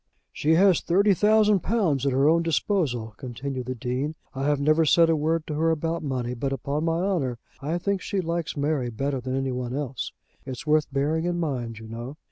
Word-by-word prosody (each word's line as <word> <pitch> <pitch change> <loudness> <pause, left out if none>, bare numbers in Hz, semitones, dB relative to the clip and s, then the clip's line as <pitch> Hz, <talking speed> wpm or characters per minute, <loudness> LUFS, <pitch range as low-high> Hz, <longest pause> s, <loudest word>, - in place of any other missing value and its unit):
"She 160 +2 +2
has 190 0 +5
thirty 200 +4 +3
thousand 210 +1 +4
pounds 170 - +1
at - - +2
her 135 +2 +3
own 165 +2 +4
disposal," 150 - 0
continued 130 0 -5
the 130 - -3
Dean. 125 +6 -2 0.2
"I 135 +1 -3
have 145 -1 +2
never 155 +3 +3
said 165 +1 +5
a - - +3
word 160 +1 0
to 155 - -4
her 160 +2 +1
about 165 +1 -1
money, 125 -4 -2
but, 135 +3 -2
upon 140 +4 -2
my 165 +1 0
honour, 155 -11 0 0.2
I 155 +5 -1
think 195 +2 -1
she 200 - -2
likes 170 -3 -2
Mary 140 -3 0
better 135 +3 -2
than 130 +1 -3
any 135 -1 -1
one 125 0 -3
else. 135 -3 -3 0.3
It's 130 -1 -7
worth 155 -1 +2
bearing 150 +4 0
in 175 0 -1
mind, 125 -8 -3
you 110 0 -10
know." 120 +6 -7
150 Hz, 210 wpm, -25 LUFS, 130-165 Hz, 0.3 s, has